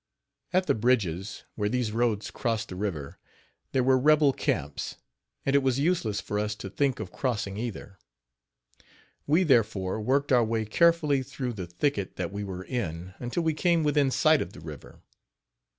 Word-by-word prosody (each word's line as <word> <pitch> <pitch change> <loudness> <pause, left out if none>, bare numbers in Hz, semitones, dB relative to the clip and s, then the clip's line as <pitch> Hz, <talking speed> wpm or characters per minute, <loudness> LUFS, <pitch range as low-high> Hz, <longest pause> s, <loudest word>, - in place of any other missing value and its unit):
At 185 +1 +2
the - - +3
bridges, 105 -6 0
where 105 -1 -1
these 120 -2 0
roads 115 -2 0
crossed 115 -3 -2
the 90 - -6
river, 90 -8 -4 0.5
there 130 - +2
were 130 0 +4
rebel 150 0 +5
camps, 70 - -2 0.5
and 135 - +2
it 140 - +5
was 130 -2 +1
useless 140 - +1
for 105 - -3
us 105 0 -1
to 100 -2 -8
think 135 +2 0
of 100 -5 -6
crossing 105 -7 -2
either. 105 -3 -6 1.3
We, 160 +6 +4
therefore, 110 - +2
worked 140 +5 +1
our 125 -2 +5
way 110 0 -1
carefully 150 +2 +3
through 125 -1 -4
the 95 -5 -6
thicket 100 +3 -1
that 90 -1 -3
we 100 +1 -4
were 95 -2 -5
in 95 -7 -4
until 125 +8 -2
we 160 -1 +2
came 170 +1 +2
within 145 -2 +3
sight 150 +4 +4
of - - -5
the - - -11
river. - - -11
120 Hz, 170 wpm, -28 LUFS, 100-140 Hz, 1.3 s, rebel